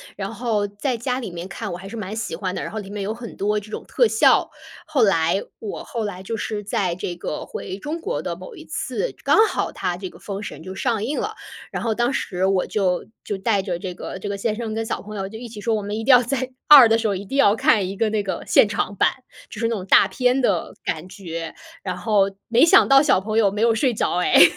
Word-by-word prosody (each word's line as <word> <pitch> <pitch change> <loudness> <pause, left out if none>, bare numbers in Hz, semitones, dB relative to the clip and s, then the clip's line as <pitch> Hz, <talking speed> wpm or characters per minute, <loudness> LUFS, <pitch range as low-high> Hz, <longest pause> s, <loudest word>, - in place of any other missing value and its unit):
然 - - -5
后 215 -4 -1
在 230 +5 -2
家 250 +2 -2
里 230 -7 -6
面 170 +1 -6
看， 195 +2 -5
我 175 - -4
还 190 +2 -10
是 225 - -8
蛮 210 -1 -5
喜 220 0 -3
欢 185 -2 -3
的， - - -3
然 - - -5
后 220 - -4
里 195 -2 -8
面 205 0 -5
有 205 +3 -2
很 230 0 -9
多 210 +1 +1
这 210 +1 -13
种 - - -6
特 485 - +3
效， - - +4 0.4
后 310 -6 +2
来 170 -1 +3 0.2
我 215 - -6
后 230 - -4
来 190 -3 -5
就 225 +4 -3
是 210 -1 -3
在 190 -3 -1
这 175 -1 -4
个， 170 -3 -5
回 190 - -6
中 300 +10 -5
国 455 +8 -2
的 - - -4
某 485 - -11
一 - - -11
次， - - -3
刚 - - +4
好 - - -2
它 175 - -2
这 185 0 -6
个 - - -15
《封 200 -1 -5
神》 150 - -7
就 190 +2 -7
上 230 -4 0
映 285 +5 -2
了， 430 +1 -3 0.4
然 - - -3
后 230 -2 +1
当 240 +3 +1
时 190 -8 -1
我 190 -1 +2
就， 185 -4 0 0.2
就 205 - -3
带 200 0 +1
着 185 -3 -3
这 180 -1 -5
个， 185 - -7
这 200 - -6
个 200 0 -3
先 215 +1 -1
生 225 -1 -4
跟 225 +1 -2
小 - - -3
朋 210 +1 -9
友 195 -1 -4
就 220 - -8
一 240 - -8
起 215 -2 -9
说， 225 +2 +1
我 215 - -1
们 205 +1 -4
一 225 - -3
定 265 - +4
要 250 -1 +8
在 260 +1 -2 0.2
2 275 -6 +10
的 225 - +4
时 225 -1 0
候， 200 - 0
一 190 - -5
定 270 +8 -4
要 215 -7 +5
看 205 -4 +3
一 195 - -5
个 220 +2 +1
那 215 0 0
个 195 - -4
现 - - +6
场 205 0 -2
版， - - +3 0.4
就 215 - -9
是 230 - +1
那 230 - -1
种 185 -3 -5
大 195 - +6
片 250 +6 +1
的 - - 0
感 160 +3 -3
觉， 165 -4 -6 0.3
然 - - -3
后 200 -3 +2 0.2
没 240 +5 +5
想 335 - +6
到 275 0 +7
小 290 -10 +4
朋 215 +2 -2
友 210 -3 +5
没 205 +2 -3
有 230 0 +4
睡 250 +2 +2
着 210 - 0
诶。 180 0 +6
210 Hz, 290 characters per minute, -22 LUFS, 195-235 Hz, 0.4 s, 2